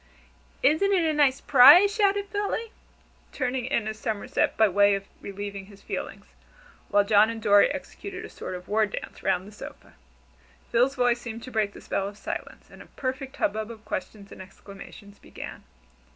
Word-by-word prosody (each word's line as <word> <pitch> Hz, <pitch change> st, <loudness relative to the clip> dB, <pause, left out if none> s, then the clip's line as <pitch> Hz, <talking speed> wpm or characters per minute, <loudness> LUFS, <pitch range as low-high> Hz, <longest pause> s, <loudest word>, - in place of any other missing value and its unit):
"Isn't 395 Hz, +8 st, +3 dB
a 325 Hz, -4 st, +1 dB
nice 280 Hz, -3 st, +2 dB
'prise?" 295 Hz, +10 st, +8 dB
shouted 405 Hz, -1 st, +1 dB
Philly, 415 Hz, +2 st, -3 dB, 0.6 s
turning 255 Hz, 0 st, -3 dB
a 220 Hz, -5 st, 0 dB
somerset 215 Hz, -1 st, -2 dB
by 220 Hz, -, +5 dB
way 200 Hz, +1 st, +4 dB
of 195 Hz, 0 st, -6 dB, 0.2 s
relieving 200 Hz, 0 st, -7 dB
his 200 Hz, -1 st, -17 dB
feelings, -, -, -6 dB, 0.6 s
while 205 Hz, 0 st, +4 dB
John 210 Hz, +1 st, +4 dB
and 230 Hz, 0 st, -5 dB
Dorry 205 Hz, -2 st, +5 dB
executed 365 Hz, +6 st, -7 dB
a -, -, -10 dB
sort -, -, -7 dB
of 180 Hz, 0 st, -10 dB
war 215 Hz, +1 st, +2 dB
dance 200 Hz, -, -8 dB
round 185 Hz, +2 st, 0 dB
the -, -, -12 dB
sofa. 210 Hz, -, -12 dB, 0.8 s
Phil's 250 Hz, +4 st, +2 dB
voice 245 Hz, -2 st, +1 dB
seemed 230 Hz, -1 st, -7 dB
to 255 Hz, -, -9 dB
break 215 Hz, -3 st, -1 dB
the -, -, -12 dB
spell 195 Hz, -, -2 dB
of 200 Hz, 0 st, -9 dB
silence, -, -, -7 dB
and -, -, -14 dB
a -, -, -14 dB
perfect 265 Hz, 0 st, -5 dB
hubbub 215 Hz, +2 st, -1 dB
of 225 Hz, -2 st, -11 dB
questions 200 Hz, 0 st, -6 dB
and -, -, -10 dB
exclamations 200 Hz, +1 st, -13 dB
began. -, -, -10 dB
220 Hz, 170 wpm, -26 LUFS, 205-275 Hz, 0.8 s, prise